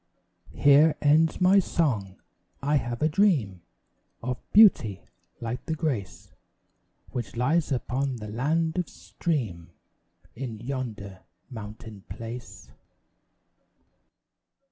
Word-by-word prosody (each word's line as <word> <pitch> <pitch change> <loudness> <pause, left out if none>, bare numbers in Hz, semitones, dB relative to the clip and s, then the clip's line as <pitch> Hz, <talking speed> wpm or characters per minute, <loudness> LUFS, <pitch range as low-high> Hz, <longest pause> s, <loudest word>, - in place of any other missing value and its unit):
Here 145 +2 +6
ends 155 +2 +3
my 190 +2 +6
song; 115 - 0 0.4
I 145 +2 +1
have 120 0 -3
a - - +5
dream 150 - +2 0.6
Of 125 0 -3
beauty 125 - +5 0.4
like 120 +1 -5
the 160 - -1
grace 135 - -3 0.8
Which 120 -2 -5
lies 150 +7 +1
upon 130 +1 -1
the 105 -3 -7
land 160 +10 0
of 180 - -2
stream 110 - -3 0.7
In 120 -2 -5
yonder 110 -7 -5 0.3
mountain 105 -2 -9
place. 115 +1 -8
125 Hz, 100 wpm, -27 LUFS, 110-155 Hz, 0.8 s, Here